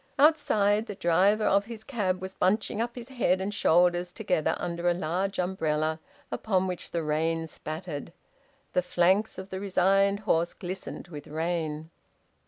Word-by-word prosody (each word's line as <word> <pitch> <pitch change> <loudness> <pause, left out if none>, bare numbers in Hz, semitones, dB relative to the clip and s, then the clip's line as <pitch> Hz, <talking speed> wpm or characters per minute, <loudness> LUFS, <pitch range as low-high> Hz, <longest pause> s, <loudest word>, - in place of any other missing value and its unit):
Outside, 270 -9 +3
the 205 - -5
driver 195 +4 +3
of 200 +1 +3
his 225 -1 -8
cab 190 -8 -1
was 190 0 -5
bunching 210 +3 +1
up 240 +1 -3
his 245 0 -8
head 230 -8 +1
and 195 +2 -3
shoulders 175 -1 +3
together 180 -6 0
under 170 0 -1
a 175 - +2
large 185 +4 -1
umbrella, 160 -4 0 0.3
upon 190 -4 0
which 180 -2 -4
the 170 -1 -2
rain 160 +2 0
spattered. 155 -1 -6 0.6
The 180 - +3
flanks 180 +4 +2
of 190 +1 -8
the 190 - -3
resigned 195 +1 +2
horse 170 -5 +1
glistened 185 -1 -6
with 150 -4 -9
rain. 160 0 -3
185 Hz, 155 wpm, -28 LUFS, 165-205 Hz, 0.6 s, Outside